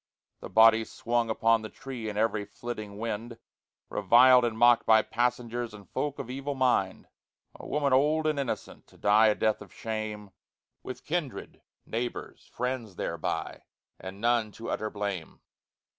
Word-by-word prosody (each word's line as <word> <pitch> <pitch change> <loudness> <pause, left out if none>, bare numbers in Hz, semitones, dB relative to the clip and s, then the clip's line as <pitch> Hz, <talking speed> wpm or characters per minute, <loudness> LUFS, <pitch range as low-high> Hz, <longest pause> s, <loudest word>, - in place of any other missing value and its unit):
The - - -9
body 110 0 +6
swung 115 +1 -1
upon 115 0 +2
the 110 - -7
tree 120 -4 -7
In 105 - -6
every 110 -1 +1
flitting 105 0 -7
wind, 115 +1 -4 0.5
Reviled 125 +5 +6
and 115 -2 -2
mocked 120 0 +5
by 110 -1 +6
passengers 120 -1 -2
And 100 -2 -14
folk 145 -1 -2
of 140 -4 -6
evil 135 +2 -4
mind. 125 -8 +1 0.5
A - - -11
woman 145 -2 +1
old 150 +4 +3
and 155 -2 +1
innocent, 135 -3 -5
To - - -21
die 105 +2 +5
a 105 - +3
death 110 -1 0
of 100 -4 -12
shame, 110 -2 -5 0.5
With 130 - -8
kindred, 155 -5 -4 0.2
neighbors, 120 +2 -5
friends 125 -6 -3
thereby, - - -3 0.4
And 95 +1 -8
none 115 -1 +1
to 115 - -6
utter 110 - -2
blame. 100 -6 -5
115 Hz, 155 wpm, -28 LUFS, 105-125 Hz, 0.5 s, body